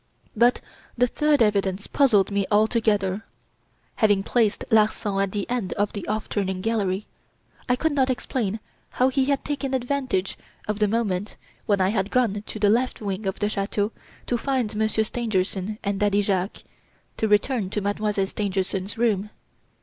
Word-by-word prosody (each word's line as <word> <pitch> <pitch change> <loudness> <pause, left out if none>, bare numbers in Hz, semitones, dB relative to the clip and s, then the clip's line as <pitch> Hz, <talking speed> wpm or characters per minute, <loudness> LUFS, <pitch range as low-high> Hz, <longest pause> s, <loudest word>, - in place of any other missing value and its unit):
"But 240 +3 +4 0.4
the 245 - +5
third 295 +1 +2
evidence 200 -2 0
puzzled 220 -9 +3
me 200 -1 0
altogether. 210 -2 +2 0.7
Having 205 -3 +3
placed 220 -1 +1
Larsan 210 -2 +2
at 195 -1 0
the 205 -1 -3
end 240 -6 -2
of 205 0 -1
the 205 - -6
'off 215 +1 -2
turning 190 -2 -2
gallery,' 205 -2 0 0.6
I 250 - +4
could 320 +5 0
not 265 -2 +2
explain 225 -4 -2 0.4
how 255 +1 +4
he 265 0 +1
had 280 0 0
taken 275 -2 -2
advantage 255 -7 -1 0.3
of 210 0 -2
the 210 - +3
moment 205 -3 -1 0.3
when 205 -2 +3
I 185 0 +3
had 200 -1 0
gone 220 -5 +1
to - - -6
the 205 -1 +2
left 250 +3 +1
wing 200 -1 -3
of 190 - -2
the 205 - 0
chateau 205 +1 -1 0.3
to 240 - -1
find 255 -6 -1
Monsieur 220 0 +2
Stangerson 210 -3 -2
and 200 -1 -1
Daddy 205 0 +2
Jacques, 195 -1 -1 0.5
to 220 - +1
return 210 0 +2
to 210 - -2
Mademoiselle 205 0 0
Stangerson's 195 0 -2
room. 215 -3 +1
210 Hz, 165 wpm, -24 LUFS, 195-235 Hz, 0.7 s, the